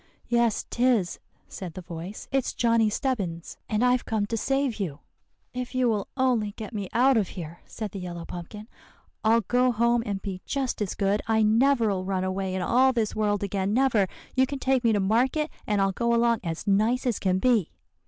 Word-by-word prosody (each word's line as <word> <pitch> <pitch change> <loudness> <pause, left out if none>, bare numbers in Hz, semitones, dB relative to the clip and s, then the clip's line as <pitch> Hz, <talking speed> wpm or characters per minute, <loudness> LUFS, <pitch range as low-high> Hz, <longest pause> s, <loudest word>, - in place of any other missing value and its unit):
"'Yes 235 -2 +1
'tis,' 240 -7 +1 0.3
said 180 -4 -8
the 185 - -7
voice, 170 +4 -8
'it's 270 -1 0
Johnny 230 -2 +3
Stebbins, 200 - -3
and 215 +3 +2
I've 250 0 +3
come 215 -2 -1
to 225 - -3
save 270 +1 0
you.' 165 -7 -4 0.5
"'If 250 +1 -5
you 255 -1 +3
will 210 -3 -1
only 240 -6 +1
get 220 +2 -8
me 200 -3 -4
out 255 +2 +4
of 205 -4 +1
here,' 170 -1 -7
said 215 -3 -6
the 195 - -6
yellow 175 -2 -6
pumpkin, 205 +5 -8 0.6
'I'll 225 +1 +4
go 250 +4 +2
home 235 +1 +2
and 200 -3 -3
be 190 -2 -6
just 270 -5 -2
as 200 - -2
good. 200 +1 +1
I 220 -1 +3
never'll 220 -3 +3
run 185 -1 -1
away 185 0 -2
in 185 - -1
all 255 +7 +4
this 225 -3 -1
world 205 -2 0
again, 200 +1 -1
never. 240 -7 +3 0.3
You 260 0 +4
can 280 +1 -4
take 260 -1 +1
me 230 - +4
to 210 - +2
market, 255 +10 +1 0.2
and 210 -2 +1
I'll 195 0 +2
go 235 +4 +1
along 235 -1 +3
as 165 -2 -4
nice 220 +6 +2
as 240 -5 0
can 185 -1 +1
be. 225 -4 +2
220 Hz, 200 wpm, -26 LUFS, 195-245 Hz, 0.6 s, out